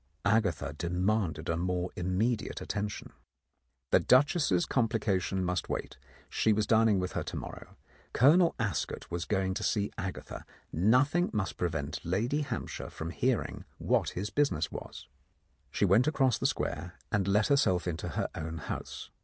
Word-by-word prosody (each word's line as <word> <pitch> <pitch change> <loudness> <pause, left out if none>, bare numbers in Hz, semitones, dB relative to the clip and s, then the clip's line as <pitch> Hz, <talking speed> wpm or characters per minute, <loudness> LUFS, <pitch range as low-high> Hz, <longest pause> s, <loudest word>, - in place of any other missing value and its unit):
Agatha 100 -9 +1
demanded 90 -1 -1
a 85 - +1
more 90 +1 -1
immediate 105 +6 -1
attention. 105 -1 -4 0.8
The - - +6
duchess's 135 - +3
complication 100 -6 0
must 90 0 -2
wait: - - -4 0.3
she 110 - +2
was 105 0 +1
dining 110 -2 +4
with 90 0 -1
her - - -2
to - - -5
morrow. - - -8 0.3
Colonel 165 +7 +5
Ascot 100 -8 -3
was 85 -1 -2
going 95 -1 0
to 105 +2 -4
see 105 -1 0
Agatha: 95 -2 -5 0.3
nothing 130 - +3
must 105 -3 -1
prevent 80 -5 -3
Lady 115 - 0
Hamp 145 - -4
shire - - -6
from 80 +1 -6
hearing 125 +4 -1
what - - +1
his 100 +3 -3
business 90 - +1
was. - - -8 0.6
She - - +1
went 100 +8 +4
across 135 -6 +2
the - - +2
Square, 85 +4 -3 0.2
and 100 -4 +1
let 105 +4 +3
herself 95 -11 +3
into 85 -2 -3
her - - -1
own 80 +1 -5
house. 75 - -6
100 Hz, 155 wpm, -30 LUFS, 90-115 Hz, 0.8 s, The